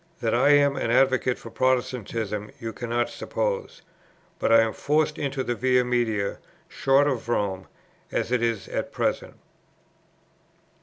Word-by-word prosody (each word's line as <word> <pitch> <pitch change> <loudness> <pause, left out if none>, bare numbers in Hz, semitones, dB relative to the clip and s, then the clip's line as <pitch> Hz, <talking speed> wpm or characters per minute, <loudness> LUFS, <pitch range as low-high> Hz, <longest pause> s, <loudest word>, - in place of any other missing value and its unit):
That 115 -3 0
I 125 +4 +4
am 145 -1 +4
an - - -1
advocate 130 0 +3
for 115 - -11
Protestantism, 115 -5 -1
you 115 -1 -5
cannot 120 +1 -1
suppose; - - -3 0.6
but - - +1
I 115 0 +7
am 115 -1 0
forced 150 +1 0
into 135 -1 -2
a 120 - -1
Via 125 +1 +2
Media, 115 -5 -1 0.3
short 135 +1 +2
of 125 -4 -2
Rome, 95 -5 -1 0.4
as - - -2
it 125 -1 +2
is 115 -6 -1
at - - -3
present." - - -2
120 Hz, 145 wpm, -25 LUFS, 115-135 Hz, 0.6 s, I